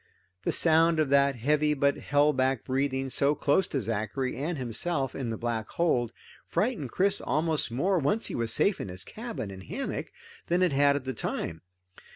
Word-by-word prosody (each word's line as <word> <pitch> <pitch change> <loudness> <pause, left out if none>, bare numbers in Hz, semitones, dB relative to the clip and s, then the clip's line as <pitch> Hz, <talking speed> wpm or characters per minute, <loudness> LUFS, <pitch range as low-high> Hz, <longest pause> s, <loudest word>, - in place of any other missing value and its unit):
The - - +2
sound 165 0 +5
of 155 -3 +2
that 140 -1 +4
heavy 150 +5 +1
but 140 0 +2
held 145 +1 +2
back 130 -1 +1
breathing, 135 0 -1
so 140 +3 +2
close 155 +7 +2
to 140 - -2
Zachary 115 +3 -2
and 155 +5 -3
himself 135 +3 -2
in 130 -4 -4
the 110 - -3
black 115 -2 -3
hold, 125 -9 +1 0.4
frightened 200 - -1
Chris 195 +8 +1
almost 155 -1 0
more, 175 +11 +1
once 160 +11 0
he - - -5
was 115 -1 0
safe 200 - +2
in - - -5
his 90 0 -5
cabin 220 - -6
and 95 -1 -9
hammock, - - -4 0.4
than 175 +2 +2
it 180 - +3
had 140 +1 +4
at 145 - -2
the 130 0 -3
time. 80 -7 -4
140 Hz, 190 wpm, -28 LUFS, 125-160 Hz, 0.4 s, sound